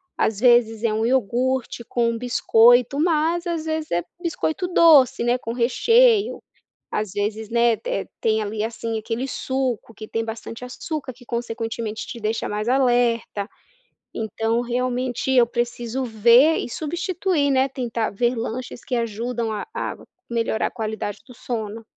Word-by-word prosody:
às 210 -2 0
vezes 235 -2 +4
é 225 - +2
um 220 +1 0
iogurte 250 +1 0
com 235 -1 +1
um 230 - -4
biscoito 245 +2 +4
mas 335 +1 +1
às 330 -2 -2
vezes 315 -1 -2
é 175 0 0 0.2
biscoito 340 +1 -2
doce, 310 -9 +5
né, 240 +1 +2
com 230 - -5
recheio, 440 - +3 0.5
às 210 -3 -2
vezes, 210 +1 -3
né, 235 0 +3
te - - -4
tem 220 -1 +2
ali 210 0 -3
assim, 225 0 -3
aquele 230 +4 -3
suco 260 -4 -2
que 215 +1 -9
tem 225 0 -2
bastante 225 +1 -7
açúcar 265 +2 -5
que 245 +1 -18
consequentemente 225 -2 -4
te - - -7
deixa 220 +1 -2
mais 210 +3 -2
alerta. 240 -5 +1 0.7
Então 225 +2 -1
realmente 250 +1 -2
eu 250 -2 +6
preciso 240 +1 -3
ver 240 +7 +5
e - - -3
substituir, 340 - -1
né, 265 0 +2
tentar 235 -4 -2
ver 240 +4 0
lanches 240 +2 -5
que 250 - -2
ajudam 230 0 -2
a 210 - -3
a - - -3 0.3
melhorar 230 -2 0
a - - -8
qualidade 220 -3 -4
do 250 - -13
sono. 225 -2 -5
240 Hz, 155 wpm, -22 LUFS, 225-260 Hz, 0.7 s, eu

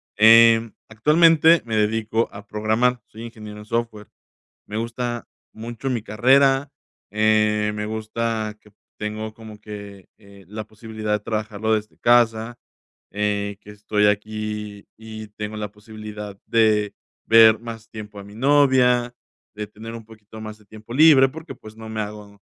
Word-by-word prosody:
Em, 115 +1 +6 0.2
actualmente 160 +7 +5
me 115 -2 -3
dedico 110 +1 0
a 100 0 -11
programar. 110 +4 0
Soy 110 - -11
ingeniero 110 -3 -9
en 105 - -11
software. 115 -2 -3 0.6
Me 105 - -8
gusta 120 +1 -4 0.3
mucho 120 +4 -6
mi 120 -3 -1
carrera. 135 +5 +3 0.4
Eh, 105 0 +2
me 105 0 -3
gusta 110 0 -3
que 105 - -21 0.3
tengo 110 +1 -5
como 110 -1 -12
que, 100 -3 -10
eh, 100 -2 -17
la 105 +2 -7
posibilidad 110 0 -5
de 105 - +1
trabajarlo 110 0 -2
desde 105 0 -3
casa, 120 -1 +2 0.5
eh, 100 0 -2
que 105 - -13
estoy 105 0 0
aquí 105 0 -3
y 110 -1 -9
tengo 105 +1 -6
la 105 -1 -5
posibilidad 105 -1 -9
de 110 -2 +2 0.3
ver 110 -1 +7
más 115 -1 -9
tiempo 105 -2 -9
a - - -9
mi 100 +1 -13
novia, 125 -2 +3 0.4
de 105 0 -5
tener 110 +2 -10
un 115 -1 -10
poquito 110 -1 -14
más 110 -1 -8
de 105 - -23
tiempo 110 +3 -12
libre 145 -1 +7
porque, 160 +4 -10
pues, 110 0 -14
no 110 0 -9
me 110 0 -3
hago 105 -1 -9
110 Hz, 150 wpm, -22 LUFS, 105-115 Hz, 0.6 s, ver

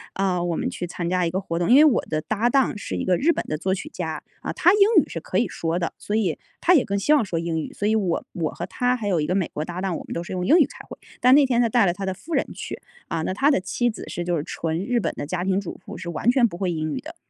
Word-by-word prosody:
呃， 185 -2 0
我 170 -2 -1
们 - - -2
去 175 - -5
参 170 0 -4
加 180 -1 +1
一 - - 0
个 185 - -1
活 170 -2 -3
动， 175 - 0
因 250 - +7
为 305 - +8
我 270 -7 +4
的 155 0 -1
搭 220 +6 0
档 265 -3 +2
是 - - -5
一 - - -2
个 180 -2 +3
日 335 +4 +3
本 - - -3
的 155 - -2
作 190 +3 -1
曲 240 +11 -7
家 - - -5 0.2
啊， - - -3
他 355 - +4
英 420 - +2 0.2
语 - - -12
是 165 - -4
可 185 - -3
以 235 - +2
说 165 +1 -2
的， 170 - -2
所 210 - -3
以 200 -7 +1 0.2
他 360 - +5
也 275 -7 +5
更 200 0 -1
希 290 +10 +3
望 290 -6 +4
说 175 -4 -3
英 165 -1 -2
语。 - - -7
所 205 - -2
以 220 - +3
我 185 -6 0
我 165 -3 -2
和 - - -5
他 250 0 0
还 210 -3 -4
有 180 -5 +2
一 - - 0
个 180 - 0
美 190 -4 0
国 150 - -2
搭 175 +2 -6
档， 190 -4 -1
我 - - -8
们 - - -6
都 170 - -3
是 - - -9
用 180 0 -2
英 320 +6 +6
语 300 - +6
开 - - -12
会， - - -9 0.2
但 255 +1 +6
那 290 -1 +6
天 245 -2 +2
他 230 - +2
带 235 -3 +4
了 175 - +2
他 195 +1 -5
的 190 - -1
夫 320 - -9
人 - - +2
去， - - -7 0.3
啊 160 - -1
那 185 - -1
他 275 +8 +3
的 275 - +3
妻 240 +6 0
子 220 - -7
是 175 - -3
就 175 -1 0
是 145 - -2
纯 165 +3 -3
日 245 0 +1
本 - - -2
的 - - -4
家 175 +4 -3
庭 190 0 +1
主 185 - -8
妇， - - -8
是 170 - -6
完 170 +8 0
全 250 -3 +4
不 170 -4 -8
会 185 -2 -1
英 155 -2 -2
语 - - -3
的， 320 +3 -10
190 Hz, 355 characters per minute, -23 LUFS, 170-240 Hz, 0.3 s, 为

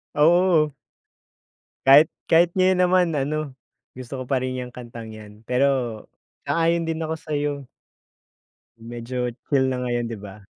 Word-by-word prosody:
Oo. 165 -1 +4 1.1
Kahit 145 +4 +7 0.2
kahit 170 +1 +4
ngayon 185 0 +3
naman, 180 0 +3
ano, 145 0 -3 0.4
gusto 130 +1 -7
ko 130 - -5
pa 135 - +1
rin 130 - -2
'yong 125 0 -8
kantang 120 -2 -9
'yan. 105 0 -13
Pero 125 +3 +3 0.8
sang-ayon 165 0 +1
din 165 0 -3
ako 160 0 -2
sa'yo. 145 -2 -3 1.1
Medyo, 120 +1 -5
chill 135 -3 +2
na 125 -1 -3
ngayon, 120 -1 -1
'di 115 -2 -6
ba? 100 0 -11
140 Hz, 135 wpm, -23 LUFS, 120-160 Hz, 1.1 s, Kahit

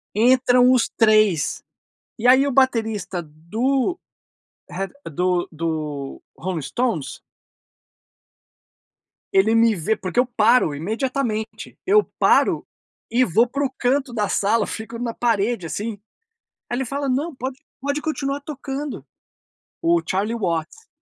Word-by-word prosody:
entram 250 +2 +5
os 255 -2 +3
3. 215 -8 +3 0.6
E 230 - -1
aí 260 +2 +6
o 280 - 0
baterista 220 -8 +1
do 230 - -1 0.7
Red 195 +2 -4 0.2
do 180 +3 0
do 155 -4 -4
Rolling 175 -2 -3
Stones. 230 - -2 2.1
Ele 200 +4 +4
me 230 -1 +4
vê, 195 +5 0
porque 190 +4 -2
eu 250 - +4
paro 235 - +3
imediatamente, 220 - -3
eu 420 +2 +5
paro - - +3 0.5
e 245 +2 +4
vou 230 +3 +3
para 280 +4 -2
o - - 0
canto 260 0 -1
da 210 -3 0
sala, 215 +4 +1
fico 225 +1 -6
na 235 -1 -3
parede 225 -4 0
assim. 210 +4 -4 0.7
Aí 240 - -2
ele 265 - -1
fala: 275 +3 -2
"Não, 285 +5 -1
pode 260 +1 -5 0.2
pode 285 +2 -1
continuar 280 -3 -2
tocando", 285 0 -6 0.8
o 340 0 +3
Charlie 200 +4 0
Watts. 180 - -3
230 Hz, 125 wpm, -22 LUFS, 195-260 Hz, 2.1 s, aí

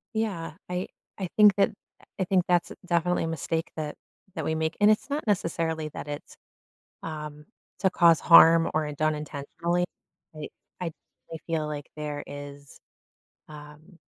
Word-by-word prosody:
Yeah, 195 -8 -2 0.2
I 180 +1 -2 0.3
I 190 - -2
think 210 -2 +8
that 200 +1 +3 0.5
I - - +2
think 185 0 +3
that's 175 -1 +2
definitely 175 0 +1
a - - -1
mistake 165 0 -2
that 155 -2 -4 0.4
that 160 - -3
we 160 - 0
make, 160 +1 -1
and 210 +1 +6
it's 215 +6 0
not 295 +2 -2
necessarily 165 -5 0
that 145 - -8
it's, 145 0 -7 0.7
um, 150 -1 -7 0.3
to 190 - +3
cause 170 -3 +5
harm 165 -1 +8
or 155 -1 0
done 155 +1 +1
intentionally, 155 +4 -2 0.5
I 150 -1 -6 0.3
I 170 - -2 0.4
I - - -4
feel 160 -2 0
like 145 -1 -6
there 150 -1 -4
is, 145 0 -10 0.7
um 150 +4 -13
160 Hz, 155 wpm, -27 LUFS, 150-180 Hz, 0.7 s, think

